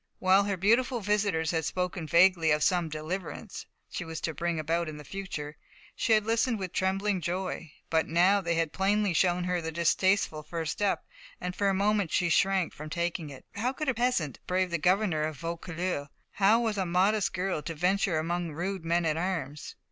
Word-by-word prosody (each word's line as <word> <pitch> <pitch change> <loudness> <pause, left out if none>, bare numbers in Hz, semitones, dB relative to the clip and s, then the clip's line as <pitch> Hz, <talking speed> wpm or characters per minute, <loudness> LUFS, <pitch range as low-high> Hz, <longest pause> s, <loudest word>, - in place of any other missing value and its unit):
While 190 +2 +4
her 200 -2 -1
beautiful 235 +6 +2
visitors 200 -6 +1
had 160 -2 0
spoken 180 0 -2
vaguely 170 0 +5
of 150 0 +3
some 175 -3 +2
"deliverance" 175 +6 -5 0.2
she - - -5
was 160 -1 -6
to 160 - -2
bring 170 +2 -2
about 165 +1 -1
in 150 - -7
the 150 - -9
future, 155 -5 -6 0.4
she 225 - +2
had 215 -1 +3
listened 230 +1 +1
with 185 -3 -5
trembling 195 0 0
joy. 175 -2 -3 0.2
But 160 -1 +2
now 180 +5 +4
they 170 -2 -1
had 165 -2 0
plainly 200 0 +1
shown 180 +1 +2
her 180 -1 0
the 160 0 -4
distasteful 170 0 +2
first 160 0 -4
step, 205 -1 -1 0.3
and 180 0 -4
for 200 -1 +1
a 195 - +1
moment 200 -2 +1
she 175 - +2
shrank 190 0 +2
from 155 +1 -8
taking 170 -1 -2
it. 135 -2 -11
How 245 +6 -1
could 305 0 -2
a - - +2
peasant 235 - 0
brave 185 0 +1
the 170 - 0
governor 180 -1 +2
of 155 -1 -2
Vaucouleurs? 170 -1 -3 0.2
How 205 +3 +4
was 220 -4 -1
a 190 - +1
modest 185 0 +2
girl 180 -3 -1
to 165 +2 -5
venture 180 +1 +1
among 170 +1 -2
rude 180 +3 -3
men 170 +1 +1
at 155 -1 +1
arms? 165 -5 -3
180 Hz, 195 wpm, -29 LUFS, 160-195 Hz, 0.4 s, vaguely